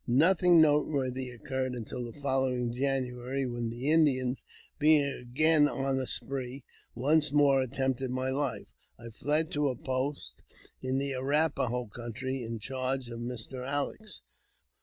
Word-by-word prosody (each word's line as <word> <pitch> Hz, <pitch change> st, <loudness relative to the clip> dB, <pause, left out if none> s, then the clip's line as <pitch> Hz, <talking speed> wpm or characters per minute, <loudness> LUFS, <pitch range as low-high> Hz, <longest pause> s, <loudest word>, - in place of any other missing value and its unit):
Nothing 170 Hz, +6 st, +5 dB
noteworthy 140 Hz, -4 st, +2 dB
occurred 130 Hz, +2 st, -3 dB
until 125 Hz, +1 st, -5 dB
the 120 Hz, +4 st, -9 dB
following 130 Hz, -3 st, 0 dB
January, 130 Hz, 0 st, -1 dB
when 120 Hz, -2 st, -3 dB
the 125 Hz, +6 st, -2 dB
Indians, 135 Hz, -5 st, +3 dB, 0.4 s
being 150 Hz, 0 st, +6 dB
again 145 Hz, +3 st, +2 dB
on 135 Hz, 0 st, -1 dB
the 130 Hz, -1 st, -2 dB
spree, 135 Hz, -1 st, -3 dB, 0.3 s
once 145 Hz, +4 st, +3 dB
more 140 Hz, -2 st, +5 dB
attempted 130 Hz, 0 st, -1 dB
my 130 Hz, +1 st, -1 dB
life. 130 Hz, -6 st, -2 dB, 0.3 s
I 115 Hz, 0 st, -9 dB
fled 150 Hz, +7 st, -1 dB
to 145 Hz, -1 st, +1 dB
a 130 Hz, -, -2 dB
post 130 Hz, +3 st, -3 dB, 0.4 s
in 130 Hz, +1 st, -1 dB
the 140 Hz, 0 st, -1 dB
Arrap 140 Hz, +4 st, +1 dB
a -, -, +2 dB
ho 125 Hz, +1 st, -2 dB
country, 125 Hz, +4 st, -5 dB
in 115 Hz, -1 st, -4 dB
charge 130 Hz, +2 st, -3 dB
of 115 Hz, -, -6 dB
Mr. 125 Hz, +1 st, -5 dB
Alex. 145 Hz, +11 st, -3 dB
130 Hz, 145 wpm, -30 LUFS, 125-145 Hz, 0.4 s, being